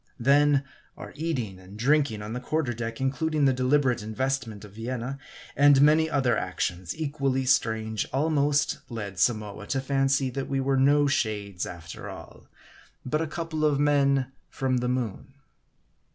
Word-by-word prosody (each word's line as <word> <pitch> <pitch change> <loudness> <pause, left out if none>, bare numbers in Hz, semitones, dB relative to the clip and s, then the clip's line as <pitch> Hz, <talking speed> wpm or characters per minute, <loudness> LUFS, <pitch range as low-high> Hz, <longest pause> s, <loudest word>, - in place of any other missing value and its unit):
Then, 140 +2 +4 0.3
our - - -9
eating 130 - -3
and 95 +2 -13
drinking 135 -3 +1
on 105 +2 -6
the 125 - -3
quarter 135 0 -1
deck 115 0 -5
including 145 +3 0
the 135 - +4
deliberate 130 -1 +2
investment 110 -1 -3
of 105 - -13
Vienna; 125 +4 -4 0.4
and 145 -1 +6
many 155 +3 +5
other 130 -6 +2
actions 90 - -3
equally 140 -4 -1
strange, 110 -3 +1
almost 145 0 +1
led 100 -6 -6
Samoa 105 -1 0
to 135 - 0
fancy 135 0 +1
that 135 +1 -4
we 135 -1 0
were 135 0 +1
no 145 +2 +4
shades, 105 -8 -1
after 85 -3 -8
all, - - -11 0.6
but 155 +5 0
a 165 - -1
couple 160 0 -4
of 145 -2 +2
men 140 -3 +2 0.2
from 130 -1 -1
the 125 0 -1
moon. 125 +1 -3
130 Hz, 150 wpm, -26 LUFS, 110-145 Hz, 0.6 s, and